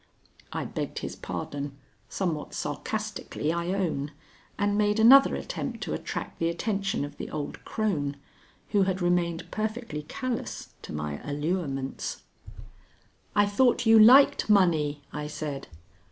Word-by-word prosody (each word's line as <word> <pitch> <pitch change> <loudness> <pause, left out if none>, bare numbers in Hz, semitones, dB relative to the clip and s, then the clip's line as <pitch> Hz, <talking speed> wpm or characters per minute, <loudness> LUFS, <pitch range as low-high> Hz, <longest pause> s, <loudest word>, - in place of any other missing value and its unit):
I - - -3
begged - - -4
his - - -5
pardon, 140 -1 -5 0.3
somewhat 165 -6 -2
sarcastically 155 +2 -3
I 170 0 -2
own, 175 -7 -1 0.5
and 205 0 +1
made 210 +1 +2
another 265 +5 +8
attempt - - -4
to - - -3
attract - - -5
the 165 - +1
attention 195 -2 -1
of 145 - -10
the - - -6
old 150 -2 -5
crone, 150 -11 -1 0.5
who 205 -2 +3
had 190 -1 +1
remained 175 -2 0
perfectly 215 -7 -3
callous 255 +3 -4
to - - -9
my 75 -1 -4
allurements. 145 -2 -3 1.1
"I 205 0 +5
thought 245 +4 +3
you 225 0 +7
liked 250 +2 +7
money," 155 -8 +3
I 150 0 -4
said. 150 -2 -5
175 Hz, 130 wpm, -27 LUFS, 150-210 Hz, 1.1 s, another